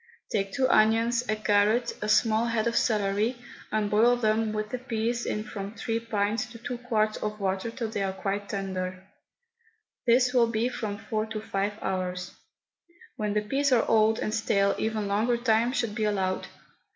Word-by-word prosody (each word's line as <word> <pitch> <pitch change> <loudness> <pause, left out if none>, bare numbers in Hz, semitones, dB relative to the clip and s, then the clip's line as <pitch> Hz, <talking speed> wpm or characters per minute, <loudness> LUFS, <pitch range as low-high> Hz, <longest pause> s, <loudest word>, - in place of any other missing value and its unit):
Take 195 -2 0
two 265 +2 +1
onions, 230 +1 +3
a 215 - +2
carrot, 215 +3 +2
a 210 - -2
small 220 +1 +3
head 230 -1 0
of 235 0 0
celery, 210 +2 +1 0.3
and 215 -1 +1
boil 230 +4 +5
them 220 -2 +1
with 215 0 -3
the 250 - -3
peas 235 -1 -2
in 210 - -2
from 205 -1 -7
three 225 -1 -2
pints 215 -1 -1
to 235 0 -11
two 240 +1 -5
quarts 215 -3 0
of 210 0 -4
water 195 +2 -1
till 230 0 -4
they 215 -2 -3
are 195 +1 -1
tender. 185 -2 -4 1.0
This 250 +2 +4
will 240 -2 +5
be 230 +1 0
from 215 -4 -4
four 215 0 -3
to 220 -1 -4
five 205 -1 -2
hours. 180 -1 -2 0.8
When 210 -4 -2
the 210 - +3
peas 275 +6 0
are 245 -3 +4
old 220 0 +4
and 215 - -2
stale 200 -3 +2
even 220 -2 -1
longer 220 +4 +1
time 235 0 +2
should 235 -5 -1
be 215 0 -1
allowed. 190 -3 -1
215 Hz, 175 wpm, -27 LUFS, 205-235 Hz, 1.0 s, boil